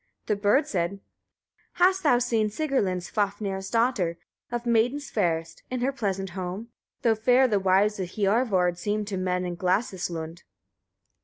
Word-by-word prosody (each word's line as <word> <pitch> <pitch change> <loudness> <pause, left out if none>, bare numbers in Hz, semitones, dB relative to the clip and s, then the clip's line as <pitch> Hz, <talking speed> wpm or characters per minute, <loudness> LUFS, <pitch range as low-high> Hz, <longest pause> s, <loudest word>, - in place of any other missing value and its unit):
The 210 - +1
bird 205 +8 +3
said: 175 -1 -1
1. 200 - -11 0.7
Hast 370 +2 +3
thou 290 -7 +4
seen 235 -3 +1
Sigrlinn, 210 - 0
Svafnir's 195 0 -2
daughter, 230 -8 +1 0.3
of 240 0 -3
maidens 245 +5 +1
fairest, 165 -5 -1
in 255 -1 -3
her 265 +2 +1
pleasant 195 -7 -3
home? 185 +5 -5 0.3
though 230 - +4
fair 250 +4 +4
the 210 -4 +1
wives 195 +2 +2
of 185 -2 -3
Hiorvard 195 -4 +1
seem 210 +3 -1
to 200 -1 -4
men 180 0 -1
in 175 - -3
Glasis 185 +1 0
lund. 165 0 -6
205 Hz, 155 wpm, -26 LUFS, 185-240 Hz, 0.7 s, thou